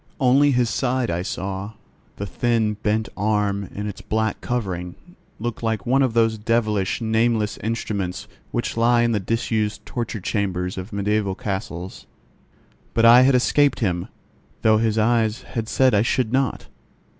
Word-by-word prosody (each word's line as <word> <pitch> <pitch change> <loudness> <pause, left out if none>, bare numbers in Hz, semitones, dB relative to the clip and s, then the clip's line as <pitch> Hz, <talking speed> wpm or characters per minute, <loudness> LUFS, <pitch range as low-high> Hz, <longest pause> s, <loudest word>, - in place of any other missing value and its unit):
Only 135 +2 +4
his 125 -4 +2
side 125 0 0
I 85 +1 -1
saw; 95 +3 -4 0.4
the 100 - -5
thin 115 0 0
bent 110 +1 0
arm 100 -1 0
in 105 - -5
its 105 - -7
black 110 0 -1
covering 90 -7 -3 0.4
looked 120 +1 -4
like 110 -4 -1
one 135 +3 +3
of 130 -4 +1
those 115 -1 +2
devilish, 110 -3 0
nameless 110 -1 +1
instruments 100 -5 -3 0.2
which 120 - -2
lie 120 +1 +3
in 120 - +2
the 110 - +1
disused 110 +1 -2
torture 115 -2 -4
chambers 90 -2 -2
of 95 +3 -7
mediaeval 100 -1 0
castles. 95 -3 -5 0.9
But 115 - +4
I 120 +2 +9
had 130 +1 +5
escaped 140 +2 +3
him, 90 -5 -1 0.6
though 110 -1 +5
his 110 -1 +1
eyes 110 +1 +1
had 115 -2 -5
said 130 -2 +3
I 100 - +4
should 120 0 0
not. 135 -3 0
110 Hz, 155 wpm, -22 LUFS, 100-120 Hz, 0.9 s, I